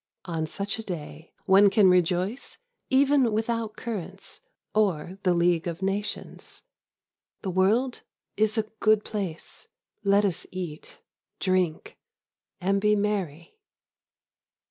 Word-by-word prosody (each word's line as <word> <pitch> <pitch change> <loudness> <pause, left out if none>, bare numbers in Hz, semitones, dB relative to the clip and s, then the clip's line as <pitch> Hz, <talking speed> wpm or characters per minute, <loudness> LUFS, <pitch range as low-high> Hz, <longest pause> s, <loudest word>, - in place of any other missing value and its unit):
On 165 -3 -2
such 200 +6 -3
a - - -5
day 160 -4 -7
one 195 +1 +6
can 200 0 +5
rejoice 180 +5 +1 0.3
even 270 -2 +4
without 225 0 -1
currants 215 -8 -6 0.3
or 190 -3 0
the 185 - +2
League 170 -1 +2
of 170 +2 -4
Nations. 200 +2 -4 0.8
The 190 - -2
world 220 +8 +2 0.3
is 215 +1 +1
a 220 - +3 0.2
good 215 -1 +3
place. 195 -7 -5 0.4
Let 200 +1 +4
us 185 -4 -2
eat, 175 -5 -7 0.4
drink, 185 -4 -1 0.6
and 195 +2 +1
be 210 0 +4
merry. 200 - -2
195 Hz, 115 wpm, -26 LUFS, 175-215 Hz, 0.8 s, one